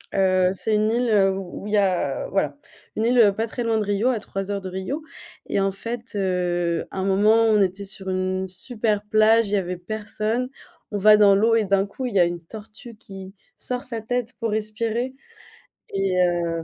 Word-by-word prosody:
heu, 185 Hz, -1 st, +3 dB
c'est 215 Hz, +3 st, -1 dB
une 215 Hz, +1 st, +2 dB
île, 240 Hz, +1 st, +1 dB
heu, 195 Hz, -3 st, +4 dB
où 195 Hz, +1 st, -7 dB
il 210 Hz, -, -4 dB
y -, -, +4 dB
a, 185 Hz, -8 st, 0 dB
voilà 150 Hz, -7 st, -1 dB, 0.4 s
une 220 Hz, -, 0 dB
île 235 Hz, -4 st, +5 dB
pas 225 Hz, -, 0 dB
très 240 Hz, +2 st, -4 dB
loin 225 Hz, -1 st, +1 dB
de 215 Hz, -, 0 dB
Rio 205 Hz, +4 st, +1 dB
à 245 Hz, -4 st, 0 dB
3 195 Hz, 0 st, -5 dB
heures 200 Hz, -1 st, -2 dB
de 190 Hz, -, -6 dB
Rio, 190 Hz, -, -4 dB, 0.4 s
et -, -, 0 dB
en 195 Hz, 0 st, +1 dB
fait, 230 Hz, +4 st, -6 dB
heu, 175 Hz, -3 st, 0 dB
à -, -, -8 dB
un 190 Hz, -, -1 dB
moment 205 Hz, +3 st, +4 dB
on 215 Hz, -2 st, +4 dB
était 195 Hz, +1 st, -1 dB
sur 195 Hz, -1 st, -7 dB
une 185 Hz, 0 st, -1 dB
super 210 Hz, +2 st, -2 dB
plage, 215 Hz, +1 st, +4 dB
il -, -, -4 dB
y -, -, +4 dB
avait 180 Hz, -1 st, -3 dB
personne. 215 Hz, +5 st, -3 dB, 0.4 s
On 205 Hz, -, -2 dB
va 210 Hz, +2 st, +7 dB
dans 205 Hz, -2 st, +6 dB
l'eau 225 Hz, +3 st, +3 dB
et 225 Hz, -2 st, +2 dB
d'un 195 Hz, 0 st, +2 dB
coup 255 Hz, +6 st, -6 dB
il 240 Hz, -5 st, -4 dB
y -, -, +5 dB
a -, -, +7 dB
une 175 Hz, 0 st, -1 dB
tortue 215 Hz, +6 st, -11 dB
qui 195 Hz, -2 st, -11 dB, 0.2 s
sort 250 Hz, 0 st, -3 dB
sa 235 Hz, -4 st, -5 dB
tête 245 Hz, +2 st, -2 dB
pour 230 Hz, -2 st, -1 dB
respirer, 225 Hz, +4 st, -2 dB, 0.7 s
et 195 Hz, -2 st, -1 dB
heu, 170 Hz, -2 st, 0 dB
205 Hz, 215 wpm, -23 LUFS, 190-225 Hz, 0.7 s, va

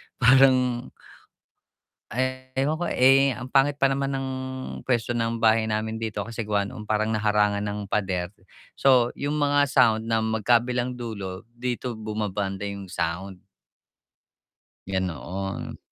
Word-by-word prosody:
parang 125 Hz, -1 st, +4 dB, 1.2 s
eh 130 Hz, +1 st, -2 dB
ewan 145 Hz, +3 st, +1 dB
ko, 175 Hz, +2 st, -3 dB
eh, 135 Hz, +2 st, +5 dB
ang 125 Hz, 0 st, -6 dB
pangit 140 Hz, +2 st, +2 dB
pa 135 Hz, -, +5 dB
naman 135 Hz, 0 st, -1 dB
ng 135 Hz, -1 st, -2 dB, 0.6 s
pwesto 120 Hz, -1 st, 0 dB
ng 115 Hz, 0 st, -1 dB
bahay 110 Hz, 0 st, +4 dB
namin 110 Hz, 0 st, -2 dB
dito 110 Hz, -2 st, -4 dB
kasi 115 Hz, 0 st, -4 dB
gawa 105 Hz, -1 st, 0 dB
nung 105 Hz, -, -8 dB
parang 105 Hz, 0 st, 0 dB
nahangan 105 Hz, -2 st, +1 dB
ng 105 Hz, 0 st, -3 dB
pader. 95 Hz, -3 st, -1 dB, 0.5 s
So 125 Hz, -3 st, +4 dB
yung 145 Hz, +2 st, -2 dB
mga 145 Hz, 0 st, +3 dB
sound 115 Hz, -4 st, +4 dB
na 115 Hz, -, +3 dB
magkabilang 120 Hz, +3 st, +1 dB
dulo, 100 Hz, -3 st, -6 dB
dito 125 Hz, 0 st, -3 dB
bumabanda 105 Hz, -2 st, -3 dB
yung 100 Hz, -2 st, -7 dB
sound. 90 Hz, +3 st, -3 dB, 1.5 s
Ganoon. 95 Hz, +1 st, -4 dB
115 Hz, 130 wpm, -25 LUFS, 105-130 Hz, 1.5 s, eh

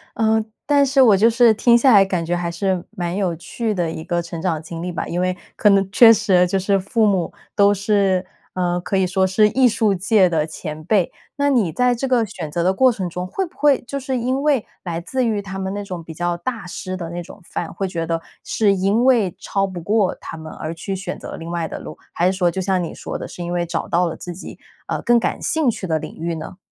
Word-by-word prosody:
呃， 220 Hz, -1 st, +2 dB, 0.2 s
但 285 Hz, -1 st, +4 dB
是 270 Hz, 0 st, +3 dB
我 225 Hz, -6 st, +7 dB
就 220 Hz, +4 st, +5 dB
是 235 Hz, -1 st, +5 dB
听 235 Hz, +2 st, +4 dB
下 250 Hz, 0 st, +5 dB
来， 200 Hz, -, +8 dB
感 180 Hz, -3 st, -2 dB
觉 175 Hz, +2 st, 0 dB
还 175 Hz, -1 st, -2 dB
是 185 Hz, +1 st, -1 dB
蛮 175 Hz, 0 st, -3 dB
有 190 Hz, -4 st, 0 dB
趣 210 Hz, +7 st, -3 dB
的 170 Hz, -3 st, -1 dB
一 160 Hz, -, -6 dB
个 175 Hz, 0 st, -1 dB
成 170 Hz, -1 st, -7 dB
长 165 Hz, -4 st, -1 dB
经 165 Hz, +1 st, -7 dB
历 180 Hz, -, -3 dB
吧。 175 Hz, -, -3 dB
因 175 Hz, +1 st, -2 dB
为 185 Hz, 0 st, 0 dB, 0.2 s
可 210 Hz, -, +4 dB
能 195 Hz, -1 st, +4 dB
确 225 Hz, +2 st, +8 dB
实 195 Hz, -5 st, +3 dB
就 195 Hz, -, 0 dB
是 195 Hz, +1 st, +1 dB
父 220 Hz, +3 st, +1 dB
母 190 Hz, -4 st, +1 dB, 0.2 s
都 200 Hz, -1 st, +5 dB
是， 195 Hz, -2 st, +1 dB, 0.3 s
呃， 175 Hz, -1 st, 0 dB
可 195 Hz, -, -1 dB
以 190 Hz, -, +3 dB
说 190 Hz, +1 st, +1 dB
是 210 Hz, +3 st, +4 dB
艺 255 Hz, +3 st, +4 dB
术 220 Hz, -3 st, +1 dB
界 195 Hz, +1 st, +3 dB
的 160 Hz, -3 st, 0 dB
前 155 Hz, -1 st, -7 dB
辈。 185 Hz, 0 st, +1 dB, 0.3 s
那 285 Hz, 0 st, +2 dB
你 220 Hz, -11 st, +2 dB
在 250 Hz, +6 st, +2 dB
这 270 Hz, +3 st, -2 dB
个 245 Hz, -3 st, +2 dB
选 180 Hz, -7 st, -7 dB
择 170 Hz, +2 st, -1 dB
的 185 Hz, +2 st, +3 dB
过 255 Hz, +6 st, +4 dB
程 195 Hz, -6 st, -3 dB
中， 180 Hz, +1 st, -5 dB
会 385 Hz, -, -2 dB
不 350 Hz, -, -16 dB
会 290 Hz, -3 st, +4 dB
就 275 Hz, +3 st, -5 dB
是 260 Hz, 0 st, -2 dB
因 255 Hz, +3 st, -1 dB
为 285 Hz, -6 st, +2 dB, 0.2 s
来 170 Hz, -2 st, -3 dB
自 255 Hz, +9 st, -2 dB
于 215 Hz, -3 st, 0 dB
他 190 Hz, 0 st, -6 dB
们 190 Hz, 0 st, -3 dB
那 205 Hz, -, -4 dB
种 180 Hz, -4 st, -6 dB
比 160 Hz, -, -10 dB
较 175 Hz, +2 st, -1 dB
大 220 Hz, +4 st, -5 dB
师 185 Hz, +1 st, -5 dB
的 170 Hz, -3 st, -6 dB
那 175 Hz, 0 st, -4 dB
种 175 Hz, -, -12 dB
范， -, -, -4 dB
会 195 Hz, -, -3 dB
觉 165 Hz, -3 st, -3 dB
得 165 Hz, 0 st, 0 dB, 0.2 s
是 205 Hz, -3 st, +2 dB
因 200 Hz, +6 st, +1 dB
为 225 Hz, -9 st, +3 dB
超 195 Hz, 0 st, -1 dB
不 185 Hz, -2 st, -7 dB
过 200 Hz, +2 st, +1 dB
他 -, -, -8 dB
们， 160 Hz, 0 st, -9 dB
而 155 Hz, +1 st, -5 dB
去 190 Hz, +4 st, -5 dB
选 185 Hz, -1 st, -5 dB
择 -, -, -7 dB
另 165 Hz, +1 st, -7 dB
外 170 Hz, -2 st, -2 dB
的 -, -, -6 dB
路？ -, -, -9 dB, 0.2 s
还 175 Hz, -, 0 dB
是 190 Hz, -, -1 dB
说， 180 Hz, -2 st, +2 dB
就 190 Hz, -, -4 dB
像 190 Hz, -1 st, 0 dB
你 165 Hz, -, -5 dB
说 -, -, -7 dB
的， -, -, -6 dB
是 175 Hz, -, -8 dB
因 175 Hz, -, -4 dB
为 175 Hz, 0 st, 0 dB
找 170 Hz, -, -3 dB
到 175 Hz, +1 st, +2 dB
了 165 Hz, -, -5 dB
自 175 Hz, -, -7 dB
己， 180 Hz, -, -10 dB, 0.3 s
啊， -, -, -2 dB
更 240 Hz, 0 st, +4 dB
感 -, -, -2 dB
兴 315 Hz, -5 st, +1 dB
趣 210 Hz, -, -3 dB
的 160 Hz, -3 st, 0 dB
领 -, -, -8 dB
域 170 Hz, +1 st, -3 dB
呢？ 160 Hz, +2 st, -7 dB
190 Hz, 280 characters per minute, -20 LUFS, 175-220 Hz, 0.3 s, 来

